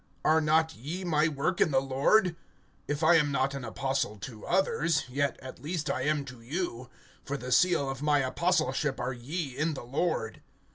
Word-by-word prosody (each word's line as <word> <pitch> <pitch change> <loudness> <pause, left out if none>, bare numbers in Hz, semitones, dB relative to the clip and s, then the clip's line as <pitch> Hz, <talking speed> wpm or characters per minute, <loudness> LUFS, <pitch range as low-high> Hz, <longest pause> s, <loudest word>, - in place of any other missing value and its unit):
Are 160 +1 +5
not 160 +1 +2
ye 160 +11 -5
my 160 -3 +2
work 155 +4 -1
in - - +5
the 135 -2 +3
Lord? 140 +8 +2 0.5
(2)If 145 +2 +1
I 170 +1 +7
am 150 -2 +2
not 135 0 +1
an 135 -2 -5
apostle 135 -1 -2
to 110 +1 -9
others, 165 -6 +1
yet 140 +2 -1
at 130 -1 -9
least 155 -1 -2
I 130 - -2
am 150 -2 +1
to 130 -3 -11
you; 130 -2 -4 0.3
for 140 - -3
the 125 -1 -6
seal 170 0 +4
of 135 0 -4
my 150 -1 +3
apostleship 150 -1 0
are 125 +2 -2
ye 135 +3 -4
in 155 +2 0
the - - -7
Lord. 135 -4 -2
145 Hz, 190 wpm, -29 LUFS, 130-160 Hz, 0.5 s, I